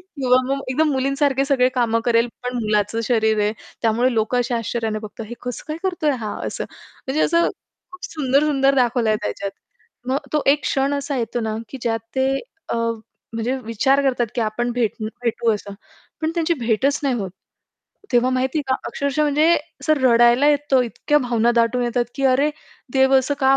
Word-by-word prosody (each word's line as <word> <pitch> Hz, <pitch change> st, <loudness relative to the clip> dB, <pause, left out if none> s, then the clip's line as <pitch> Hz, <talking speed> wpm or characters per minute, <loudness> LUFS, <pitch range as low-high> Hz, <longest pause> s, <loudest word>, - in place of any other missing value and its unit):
किंवा 260 Hz, -8 st, +1 dB
मग 275 Hz, 0 st, -1 dB
एकदम 305 Hz, +4 st, +2 dB
मुलीसारखे 275 Hz, +1 st, +1 dB
सगळे 265 Hz, -3 st, +3 dB
कामं 230 Hz, -2 st, +1 dB
करेल 235 Hz, 0 st, +3 dB
पण 250 Hz, 0 st, -3 dB
मुलाचं 210 Hz, +1 st, 0 dB
शरीर 220 Hz, -3 st, +2 dB
आहे 210 Hz, +1 st, +1 dB, 0.3 s
त्यामुळे 235 Hz, +3 st, +2 dB
लोकं 220 Hz, +3 st, +1 dB
अशा 245 Hz, 0 st, 0 dB
आश्चर्याने 225 Hz, -1 st, -2 dB
बघतात, 215 Hz, +1 st, -8 dB
हे 240 Hz, -, -7 dB
कसं 245 Hz, -1 st, -5 dB
काय 310 Hz, -, -3 dB
करतोय 355 Hz, -5 st, 0 dB
हा 215 Hz, -, -4 dB
असं. -, -, -4 dB, 0.4 s
म्हणजे 285 Hz, +4 st, 0 dB
असं 335 Hz, +1 st, +3 dB, 0.4 s
खूप 365 Hz, -, -10 dB
सुंदर-सुंदर 275 Hz, -1 st, +2 dB
दाखवलंय 240 Hz, -4 st, +2 dB
त्याच्यात. 195 Hz, -, -3 dB, 0.6 s
मग 265 Hz, +2 st, +1 dB
तो 300 Hz, -, +1 dB
एक 290 Hz, +1 st, +3 dB
क्षण 275 Hz, +1 st, 0 dB
असा 280 Hz, 0 st, -2 dB
येतो 235 Hz, 0 st, -2 dB
ना, 220 Hz, -1 st, -2 dB
की 270 Hz, -, -8 dB
ज्यात 225 Hz, -1 st, 0 dB, 0.2 s
ते 265 Hz, 0 st, +2 dB, 0.4 s
अ, -, -, 0 dB, 0.6 s
म्हणजे 235 Hz, +4 st, -1 dB
विचार 250 Hz, +5 st, +2 dB
करतात 250 Hz, -3 st, +1 dB
की 240 Hz, -, -1 dB
आपण 230 Hz, +2 st, -1 dB
भेट 235 Hz, -4 st, 0 dB, 0.3 s
भेटू 235 Hz, -1 st, +1 dB
असं. 205 Hz, -1 st, -7 dB, 0.5 s
पण 315 Hz, -, 0 dB
त्यांची 335 Hz, 0 st, +1 dB
भेटच 245 Hz, +5 st, +1 dB
नाही 275 Hz, -3 st, +1 dB
होत. 195 Hz, -5 st, -4 dB, 0.8 s
तेव्हा 245 Hz, +1 st, +3 dB
माहिती 260 Hz, +3 st, 0 dB
आहे 295 Hz, -, 0 dB
का -, -, +4 dB
अक्षरशः 280 Hz, +1 st, -1 dB
म्हणजे 300 Hz, +2 st, +3 dB, 0.3 s
असं 310 Hz, -, +3 dB
रडायला 240 Hz, +3 st, +5 dB
येतो 290 Hz, -2 st, +3 dB
इतक्या 295 Hz, +5 st, 0 dB
भावना 240 Hz, -3 st, +1 dB
दाटून 235 Hz, +1 st, +2 dB
येतात, 240 Hz, 0 st, 0 dB
की 275 Hz, -, -2 dB
अरे 270 Hz, +3 st, +3 dB, 0.4 s
देव 265 Hz, 0 st, +4 dB
असं 275 Hz, +2 st, -1 dB
का 270 Hz, 0 st, +5 dB
255 Hz, 180 wpm, -21 LUFS, 230-275 Hz, 0.8 s, रडायला